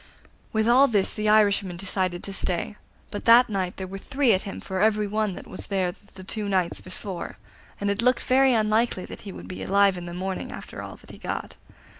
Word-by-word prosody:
With 220 -1 +1
all 260 +4 +6
this 205 -6 +1
the 215 -1 0
Irishman 200 -4 +3
decided 185 -1 -2
to 195 - -6
stay; 185 +2 -2 0.4
but 205 - -5
that 235 +1 +7
night 185 -3 -2
there 190 - -4
were 195 +1 -7
three 270 0 +2
at 190 - +1
him 195 - -6
for 190 -1 -3
every 215 0 +3
one 210 -1 -1
that - - -9
was - - -6
there 185 -3 0 0.2
the 190 - -10
two 205 +2 -4
nights 185 -3 0
before, 185 -1 -7 0.4
and 205 - -2
it 200 +2 -1
looked 250 +1 +3
very 265 +1 +4
unlikely 220 -3 +2
that - - -10
he 200 - -8
would - - -10
be 185 - -7
alive 200 -1 +3
in 175 - -8
the 175 - -6
morning 190 +1 -4
after - - -8
all - - -8
that - - -15
he - - -12
got. - - -5
200 Hz, 220 wpm, -25 LUFS, 185-220 Hz, 0.4 s, that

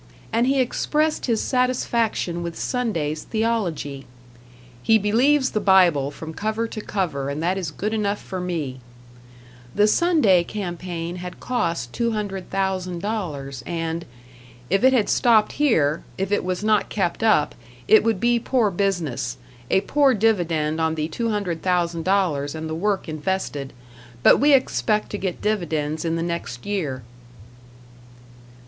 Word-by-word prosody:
And 235 +2 +2
he 270 0 +2
expressed 300 +5 0
his 230 -3 +1
satisfaction 235 -8 0
with 170 -1 -5
Sunday's 165 - -2
theology: 190 - -2 0.7
"He 220 - +4
believes 260 +7 +3
the 215 - 0
Bible 180 -8 +4
from 160 +2 -8
cover 220 +5 -2
to 215 - -6
cover 160 -11 -2
and 140 +2 -3
that 180 +2 +1
is 185 -5 -3
good 210 +8 -3
enough 205 -2 0
for 185 - -6
me." 155 -8 -3 1.0
The 205 - +5
Sunday 215 - +4
campaign 175 -3 -5
had 180 0 -8
cost 170 - -2
$200,000, 190 - -3
and 165 -1 -3 0.7
"If 195 +3 +2
it 260 - +7
had 240 -6 +2
stopped 225 -3 +4
here, 165 - +2
if 195 +1 -2
it 205 - +1
was 185 +2 -2
not 215 -1 +2
kept 190 -2 -1
up, 215 -10 +3 0.3
it 220 - +6
would 225 -4 +1
be 240 +2 +2
poor 230 -3 +1
business; 160 -10 -1 0.3
a 190 - +3
poor 275 +4 +3
dividend 165 -8 +1
on 160 0 +1
the 155 0 -2
$200,000 175 -5 0
and 160 0 -5
the 160 - -4
work 195 +4 -1
invested. 155 -3 -3 0.5
But - - +7
we 290 +1 +5
expect 215 -5 +1
to 205 - -3
get 185 -3 -4
dividends 160 -7 -1
in 165 -1 -1
the 165 - -1
next 170 -8 -4
year." 155 -11 -2
190 Hz, 140 wpm, -23 LUFS, 160-220 Hz, 1.0 s, it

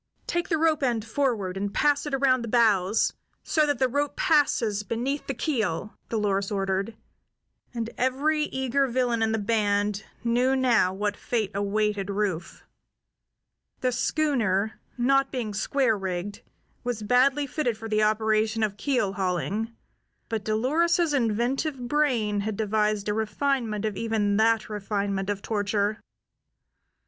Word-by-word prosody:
"Take 345 0 -2
the 325 - +2
rope 315 -1 +2
end 235 -5 0
forward, 225 -7 -1
and 200 +1 -2
pass 290 +5 +2
it 290 - -5
around 260 -2 +3
the 235 - -5
bows, 215 -4 +3 0.3
so 305 -2 +2
that 290 - +1
the 260 - +2
rope 285 +3 -1
passes 275 - +2
beneath 240 +7 -3
the 275 - -2
keel," 220 - -2
Dolores 200 -3 0
ordered, 195 +2 -1 0.8
and 230 -2 -3
every 295 +4 +1
eager 265 0 0
villain 240 -2 0
in 220 0 +2
the 220 - +1
band 205 -1 0 0.2
knew 245 +3 +2
now 240 -8 +3
what 205 +2 -2
fate 220 -5 -2
awaited 205 0 0
Rufe. 195 -4 -2 1.2
The 255 - +1
schooner, 225 -8 0 0.2
not 275 +2 +2
being 235 -5 -3
square 240 +2 +1
rigged, 190 0 -4 0.4
was 240 -3 -3
badly 265 +6 +3
fitted 260 -5 -1
for 225 - -7
the 215 -1 +1
operation 215 +1 +2
of 205 -1 -1
keel 245 -7 0
hauling; 195 +4 -1 0.6
but 225 -2 -2
Dolores's 310 - +2
inventive 255 +4 0
brain 240 -8 +1
had 205 0 -3
devised 210 -1 0
a 210 - +1
refinement 220 0 -1
of 215 -2 -2
even 210 -2 0
that 225 0 +3
refinement 200 -2 -2
of 200 -1 -3
torture. 205 0 0
220 Hz, 140 wpm, -26 LUFS, 205-260 Hz, 1.2 s, around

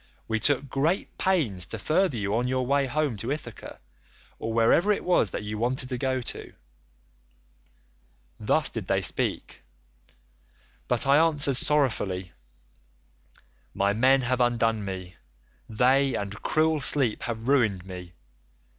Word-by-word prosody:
We 110 -1 -1
took 140 +2 +2
great 150 +8 -1
pains 125 - 0
to 115 - -5
further 155 - +1
you 100 0 -1
on 120 +2 0
your 130 0 -1
way 140 +1 +1
home 145 -3 -1
to 115 +6 -4
Ithaca, 130 -7 -7 0.6
or 115 - -4
wherever 115 - +3
it 205 - -1
was 175 - +2
that - - -5
you 105 0 -5
wanted 130 +3 -1
to 125 - -3
go 130 -1 -1
to.' 120 - -8 1.9
"Thus 145 +8 +1
did 110 -5 -6
they 95 0 +1
speak, - - 0 1.3
but 125 +2 +1
I 140 +1 +5
answered 145 -5 +2
sorrowfully, 110 -12 0 1.4
'My 100 +1 +1
men 130 +5 +4
have 125 +1 0
undone 115 -3 +1
me; 95 -2 -7 0.5
they, 130 +4 +2
and 100 -1 -4
cruel 155 -1 +1
sleep, 130 -5 +2
have 115 0 -5
ruined 110 -10 +2
me. 90 -2 -9
125 Hz, 135 wpm, -26 LUFS, 105-140 Hz, 1.9 s, I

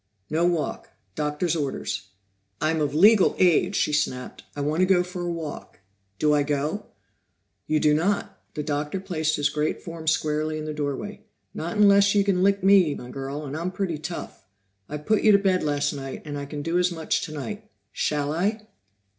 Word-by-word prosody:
"No 165 +3 +2
walk. 170 -3 -2 0.2
Doctor's 150 - -1
orders." 135 -9 -3 0.5
"I'm 155 0 +1
of 145 -1 -1
legal 205 +4 +6
age!" 180 +2 +3
she 150 - +1
snapped. 130 -4 -2
"I 145 - -3
want 150 +3 0
to 185 - +4
go 180 -2 +4
for 180 0 -6
a 175 0 -2
walk. 160 -9 -7 0.4
Do 150 +5 +3
I 145 - +3
go?" 145 +6 -2 0.8
"You 155 - +2
do 150 0 +4
not." 195 +7 0
The 150 - -2
Doctor 150 +4 -2
placed 160 -5 -1
his 145 0 +1
great 150 0 -2
form 165 -1 -8
squarely 155 0 +1
in 155 - -5
the 155 - -4
doorway. 150 +8 -4 0.3
"Not 170 +5 -4
unless 200 0 +5
you 200 - +5
can 195 -2 +1
lick 200 0 +2
me, 190 -6 +5
my 125 0 -9
girl, 140 +2 -5
and 140 +1 -5
I'm 170 +3 -2
pretty 180 -4 -3
tough. 160 - -7 0.4
I 150 - -3
put 205 +8 +1
you 215 - +6
to - - +8
bed 190 -2 +2
last 145 -1 0
night, 135 -2 -6
and 145 -1 -5
I 140 0 -5
can 145 0 -5
do 170 +3 +1
as 180 0 +2
much 160 -2 -1
tonight. 200 +6 -6 0.2
Shall 145 -1 -1
I?" 210 +6 -1
155 Hz, 190 wpm, -25 LUFS, 150-185 Hz, 0.8 s, to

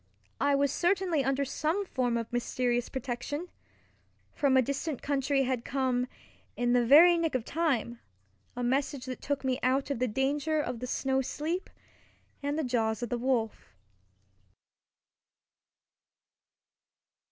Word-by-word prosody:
I 285 0 +3
was 280 -1 +2
certainly 350 -4 +1
under 270 +1 0
some 315 +8 -1
form 245 -8 0
of 230 0 -5
mysterious 245 0 0
protection. 265 +6 -4 0.8
From 275 -3 +3
a - - +6
distant 280 +2 -3
country 275 -1 +1
had 255 -2 -1
come, 255 -2 0 0.5
in 245 0 +1
the 245 -1 +4
very 335 +8 +7
nick 325 -4 0
of 245 -3 -1
time, 265 -8 -1 0.6
a 245 - -3
message 265 +2 0
that 255 -1 -6
took 285 -1 -2
me 260 0 0
out 265 +3 +1
of 275 - -2
the 255 - +1
danger 285 +6 0
of 250 -5 -3
the 250 - -5
snow 265 +1 0
sleep 315 +7 -3 0.7
and 285 +1 -2
the 315 - 0
jaws 225 -3 0
of 240 - -3
the 245 - -1
wolf. 225 - -1
265 Hz, 140 wpm, -30 LUFS, 245-290 Hz, 0.8 s, very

